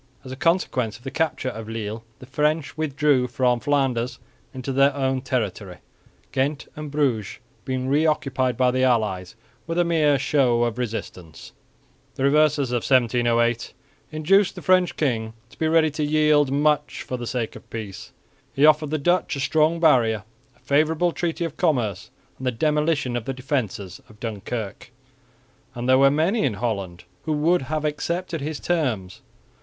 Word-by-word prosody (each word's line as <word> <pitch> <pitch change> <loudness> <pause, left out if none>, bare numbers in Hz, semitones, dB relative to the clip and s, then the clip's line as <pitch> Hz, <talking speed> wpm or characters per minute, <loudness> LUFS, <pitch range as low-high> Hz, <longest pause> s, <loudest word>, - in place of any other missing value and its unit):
As 130 - -9
a - - -5
consequence 130 - 0
of 120 - -22
the 135 - -5
capture 160 -5 -1
of 110 -2 -8
Lille, 110 0 -5
the - - -12
French 150 +3 -1
withdrew 145 -4 +1
from 125 0 +1
Flanders 130 -3 0 0.3
into 130 +1 -5
their 135 +1 +3
own 135 -1 0
territory, 105 -8 -3 0.5
Ghent 140 +2 -1
and 150 -1 -6
Bruges 135 -8 -1 0.3
being 130 0 -2
re 150 +4 +3
occupied 130 -5 0
by 125 -1 +3
the 130 +1 0
allies 105 -7 0 0.3
with 165 0 -3
a 175 - +4
mere 155 -4 +3
show 130 -3 +2
of 120 0 -2
resistance. 105 -8 -6 0.6
The 130 - -3
reverses 145 -2 +3
of 125 - +1
1708 120 -1 +1 0.4
induced 180 +6 +2
the - - -9
French 185 -1 +3
king 115 -7 -1 0.2
to - - -19
be 160 - +1
ready 160 -1 +3
to 150 +1 -3
yield 150 -2 +3
much 150 +1 +1
for 130 - -4
the 120 -1 -6
sake 120 -3 -3
of - - -13
peace. 105 -5 -7 0.4
He 140 - +4
offered 155 -1 +4
the 155 - 0
Dutch 175 +3 +1
a - - -5
strong 155 +5 +2
barrier, 115 -9 +3 0.3
a - - -28
favourable 155 +4 +2
treaty 170 0 -2
of 165 - -6
commerce 115 - 0 0.3
and 130 - -4
the - - +2
demolition 150 0 0
of 120 -2 -3
the 135 - -2
defences 120 -8 -3
of 105 - -18
Dunkirk; 110 0 -5 0.9
and 120 +1 -4
there 130 0 +5
were 135 0 +6
many 165 +10 +1
in 125 -7 0
Holland 100 -6 -3 0.2
who 155 - 0
would 165 +4 +2
have 155 +3 -3
accepted 165 +2 -2
his 150 +1 -4
terms. 125 - -2
135 Hz, 170 wpm, -23 LUFS, 120-155 Hz, 0.9 s, were